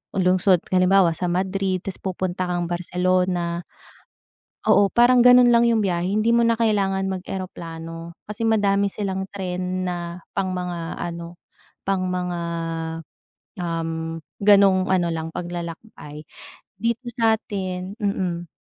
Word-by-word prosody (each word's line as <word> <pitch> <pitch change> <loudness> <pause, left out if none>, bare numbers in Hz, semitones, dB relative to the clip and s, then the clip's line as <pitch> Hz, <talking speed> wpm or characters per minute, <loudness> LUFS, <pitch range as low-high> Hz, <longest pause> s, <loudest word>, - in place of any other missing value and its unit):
lungsod 185 -1 +3
halimbawa, 185 -1 +5
sa 180 +2 -3
Madrid 190 +1 -1
tas 195 - -5
pupunta 185 -1 -2
kang 175 -1 -1
Barcelona. 180 -1 0 1.1
Oo, 200 -1 +5
parang 245 +1 +5
ganun 250 -1 +7
lang 235 0 +5
yung 225 -3 +2
biyahe 175 -1 0
hindi 215 +3 +2
mo 235 - +4
na 230 0 +3
kailangan 200 -4 +1
mag-eroplano, 170 -3 -6
kasi 210 +2 -6
madami 200 -2 +2
silang 190 -1 -3
tren 185 -1 -3
na 175 -1 -4 0.2
pang 190 -1 -1
mga 175 -2 -4
ano, 170 0 -6 0.5
pang 190 -1 0
mga, 180 -1 -2 1.2
um, 165 -1 -3 0.2
ganong 195 -2 +5
ano 175 -2 +2
lang 165 -1 -3
paglalakbay. 170 -3 -7 0.5
Dito 235 +3 -1
satin 200 -5 -1
mm. 180 -4 -2
185 Hz, 120 wpm, -23 LUFS, 175-200 Hz, 1.2 s, ganun